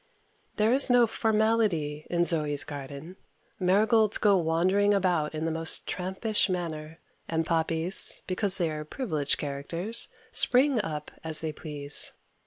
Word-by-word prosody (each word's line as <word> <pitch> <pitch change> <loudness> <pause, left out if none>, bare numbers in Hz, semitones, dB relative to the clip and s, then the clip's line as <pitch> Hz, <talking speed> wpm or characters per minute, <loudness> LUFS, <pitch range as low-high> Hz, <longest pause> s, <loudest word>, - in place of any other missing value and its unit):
There 215 +3 +2
is 275 +1 +6
no 245 -1 +5
formality 215 -10 0
in 175 0 +1
Zoe's 150 -4 +2
garden. 145 +4 -9 0.4
Marigolds 210 +3 +3
go 205 -2 +3
wandering 185 +4 +2
about 175 -6 0
in 155 +1 -3
the 165 - -1
most 160 0 -1
trampish 190 +4 -1
manner, 165 -3 -5 0.3
and 160 0 -1
poppies, 165 +2 0
because 190 +1 +1
they 170 -3 0
are 150 0 -5
privileged 155 - -2
characters, 165 +10 -1 0.2
spring 255 -1 +3
up 150 -6 -6
as 160 -1 -2
they 160 -1 -4
please. 145 -2 -3
170 Hz, 135 wpm, -27 LUFS, 155-205 Hz, 0.4 s, is